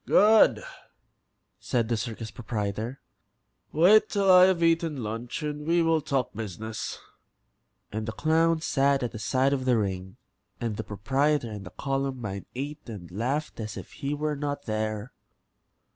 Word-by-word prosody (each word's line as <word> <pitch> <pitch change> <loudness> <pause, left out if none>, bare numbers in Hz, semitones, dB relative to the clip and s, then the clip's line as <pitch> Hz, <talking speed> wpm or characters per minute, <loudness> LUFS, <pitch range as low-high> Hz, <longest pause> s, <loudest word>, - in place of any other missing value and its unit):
"Good," 215 - +6 1.0
said 120 -3 0
the 120 - +1
circus 115 -1 -5
proprietor. 110 +2 -4 0.7
"Wait 185 +8 +6
till 200 -2 +3
I 180 0 +9
have 185 -3 +2
eaten 165 -5 +2
lunch 115 +7 -4
and 150 0 -4
we 170 0 +3
will 165 -1 +2
talk 135 -3 -1
business." 110 +1 -5 0.9
And 110 +1 -4
the - - -1
clown 160 +4 +2
sat 140 -2 +2
at 120 - -2
the 110 - -7
side 130 +5 +2
of 130 -2 -1
the 125 -2 +3
ring, 95 0 -3 0.4
and 115 -3 -2
the 110 - -4
proprietor 130 +5 0
and 105 -2 -7
the - - -12
Columbine 135 -8 -3
ate 145 +1 -5
and 90 -6 -8
laughed 130 - -2
as 110 -2 -5
if - - -9
he 145 0 -3
were 150 0 -1
not 145 0 -4
there. 110 +2 -3
130 Hz, 155 wpm, -27 LUFS, 110-150 Hz, 1.0 s, I